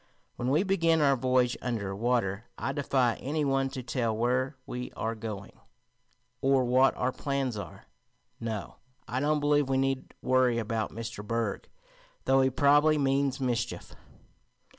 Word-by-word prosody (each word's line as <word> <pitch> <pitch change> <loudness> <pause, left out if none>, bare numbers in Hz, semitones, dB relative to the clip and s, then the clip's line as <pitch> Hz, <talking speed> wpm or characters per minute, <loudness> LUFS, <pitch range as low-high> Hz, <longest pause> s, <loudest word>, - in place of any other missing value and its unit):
When 120 - -2
we 150 +7 +3
begin 165 -5 +2
our 140 -2 +4
voyage 125 -1 +2
under 105 -6 -3
water 110 -2 0
I - - -2
defy 130 -4 +1
any 150 +2 -2
one 135 -1 +1
to 130 -1 -6
tell 115 -3 -1
where 125 +4 0
we 125 0 -5
are 110 +1 -2
going, 105 -2 -6 0.9
or 135 -1 +3
what 130 +2 +4
our 125 +1 0
plans 135 -3 -2
are. 100 - -8 0.5
No, 110 -3 -5 0.3
I 125 - -2
don't 150 +2 +1
believe 145 -1 +2
we 135 - +2
need 135 0 -1
worry 130 -2 +3
about 110 -1 -1
Mr. 115 -2 -6
Berg, 115 -1 -2 0.6
though 135 0 +4
he 130 - +3
probably 145 +3 +4
means 135 -1 +1
mischief." 120 -3 -2
130 Hz, 150 wpm, -29 LUFS, 115-140 Hz, 0.9 s, our